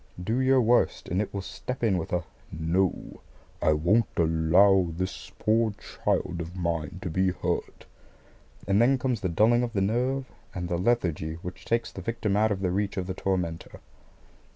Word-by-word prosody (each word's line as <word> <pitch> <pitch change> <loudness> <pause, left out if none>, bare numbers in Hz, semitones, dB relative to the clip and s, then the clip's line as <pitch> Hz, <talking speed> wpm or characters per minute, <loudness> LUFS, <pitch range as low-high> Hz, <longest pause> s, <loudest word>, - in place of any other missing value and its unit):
Do 110 +7 0
your 130 -1 +4
worst, 120 +2 +2
and 90 +3 +1
it 105 - -4
will 100 -1 -4
step 125 +5 -6
in 110 -5 +3
with 80 - -6
a 90 0 0 0.3
"No, 85 +4 -1 0.4
I 80 - +4
won't 90 +9 +3
allow 85 +4 +4
this 95 +3 -5
poor 110 0 +2
child 90 -3 -2
of 85 +2 -7
mine 85 -2 -2
to 90 - -3
be 95 +3 +2
hurt"; 90 - -3 0.8
and 100 +3 +3
then 130 +3 +4
comes 125 -4 -1
the 95 - -1
dulling 110 +8 +4
of 120 -2 -2
the 100 - 0
nerve 125 +6 0 0.3
and 90 -1 -3
the 85 - -1
lethargy 90 -7 0
which 90 +1 -8
takes 115 -1 0
the 95 - -8
victim 105 0 -1
out 110 +1 +3
of 95 -2 -2
the 90 -2 0
reach 100 +2 -1
of 95 - -1
the 95 - -3
tormentor. 90 -4 -3
95 Hz, 180 wpm, -27 LUFS, 90-115 Hz, 0.8 s, your